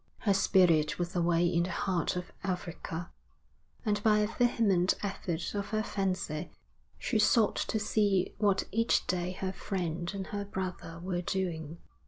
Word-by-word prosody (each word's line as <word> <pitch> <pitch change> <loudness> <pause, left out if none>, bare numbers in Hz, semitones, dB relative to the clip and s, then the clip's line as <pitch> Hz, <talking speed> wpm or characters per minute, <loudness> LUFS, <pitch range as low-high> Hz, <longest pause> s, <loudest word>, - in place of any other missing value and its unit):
Her 200 - +3
spirit 180 -5 +4
was 175 +2 -3
away 170 0 +3
in 170 0 +2
the 175 - -1
heart 180 -3 0
of 180 0 -5
Africa, 175 -2 -4 0.7
and 205 -1 +1
by 215 0 +4
a 210 - +3
vehement 220 -6 +2
effort 180 -4 -3
of 200 -1 -2
her 215 0 0
fancy 185 -7 -2 0.5
she 225 - 0
sought 220 0 +4
to - - 0
see 205 -3 +1
what 200 -2 +3
each 230 +2 +2
day 180 0 -1
her 190 0 -3
friend 175 -4 -3
and 195 -1 -3
her 205 0 -1
brother 185 -4 -5
were 180 -1 -1
doing. 170 -4 -3
185 Hz, 155 wpm, -31 LUFS, 175-205 Hz, 0.7 s, spirit